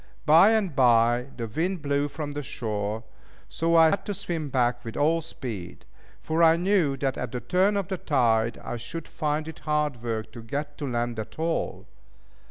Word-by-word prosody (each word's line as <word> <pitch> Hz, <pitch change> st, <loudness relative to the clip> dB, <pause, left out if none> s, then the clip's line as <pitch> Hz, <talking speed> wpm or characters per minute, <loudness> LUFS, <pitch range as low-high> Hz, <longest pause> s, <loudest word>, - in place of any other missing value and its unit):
Bye 165 Hz, +6 st, +7 dB
and 200 Hz, -9 st, 0 dB
bye, 120 Hz, -1 st, +4 dB
the 115 Hz, -, -3 dB
wind 165 Hz, -, -2 dB
blew 145 Hz, 0 st, +1 dB
from 145 Hz, 0 st, -5 dB
the 145 Hz, +1 st, -4 dB
shore, 110 Hz, -4 st, -3 dB, 0.4 s
so 165 Hz, +1 st, 0 dB
I 160 Hz, -1 st, +7 dB
had 195 Hz, -1 st, -1 dB
to 205 Hz, -, -2 dB
swim 170 Hz, -6 st, -3 dB
back 120 Hz, -2 st, +1 dB
with 115 Hz, -, -7 dB
all 160 Hz, +3 st, +2 dB
speed; 115 Hz, -, -7 dB, 0.4 s
for 160 Hz, +1 st, 0 dB
I 165 Hz, -1 st, +7 dB
knew 175 Hz, -6 st, +2 dB
that 135 Hz, 0 st, -1 dB
at -, -, -4 dB
the 125 Hz, -, -3 dB
turn 190 Hz, +8 st, +2 dB
of 195 Hz, -, -2 dB
the 190 Hz, -3 st, -3 dB
tide, 115 Hz, -5 st, +2 dB
I 120 Hz, -, -4 dB
should 150 Hz, +8 st, -7 dB
find 155 Hz, 0 st, -2 dB
it 160 Hz, -, -8 dB
hard 150 Hz, -5 st, -1 dB
work 115 Hz, -2 st, -3 dB
to 120 Hz, -, -9 dB
get 145 Hz, +6 st, -4 dB
to 145 Hz, -, -3 dB
land 120 Hz, -2 st, -2 dB
at 110 Hz, -, -7 dB
all. 165 Hz, +1 st, -2 dB
145 Hz, 190 wpm, -26 LUFS, 120-165 Hz, 0.4 s, Bye